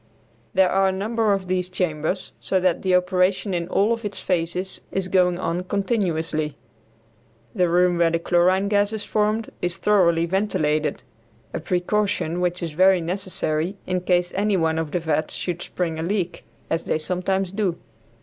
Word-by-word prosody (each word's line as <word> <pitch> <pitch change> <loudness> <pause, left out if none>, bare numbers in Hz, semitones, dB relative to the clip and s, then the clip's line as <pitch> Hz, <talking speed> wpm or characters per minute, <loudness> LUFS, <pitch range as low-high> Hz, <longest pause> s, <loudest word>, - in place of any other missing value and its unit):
There 190 -1 +4
are 195 0 +3
a - - +2
number 215 +3 0
of 195 -2 0
these 180 0 -1
chambers, 180 0 -2
so 190 - 0
that 180 -2 +1
the 185 -1 +2
operation 185 +2 +1
in 170 -1 -1
all 205 +5 +2
of 230 0 -5
its 205 -1 -3
phases 180 +1 -2
is 190 -1 -1
going 180 -1 +3
on 175 -1 -2
continuously. 165 - -1 1.0
The 180 -1 +2
room 175 0 +3
where 170 -1 +4
the 170 - +1
chlorine 180 +3 +2
gas 205 +1 +2
is 215 -1 -4
formed 215 +1 0
is 175 -1 -2
thoroughly 170 -5 +3
ventilated, 155 -7 0 0.5
a - - -2
precaution 180 0 0
which 180 0 -1
is 165 - -3
very 185 +4 +5
necessary 175 0 -2
in 185 0 -1
case 180 0 +1
any 205 0 +1
one 160 -1 +1
of 160 -2 -2
the 175 - -1
vats 155 -1 -1
should 175 -1 -3
spring 165 -3 -3
a - - -2
leak, 180 0 -2 0.2
as 165 - -2
they - - +1
sometimes 180 +3 -1
do. 195 -4 -1
180 Hz, 170 wpm, -23 LUFS, 170-195 Hz, 1.0 s, very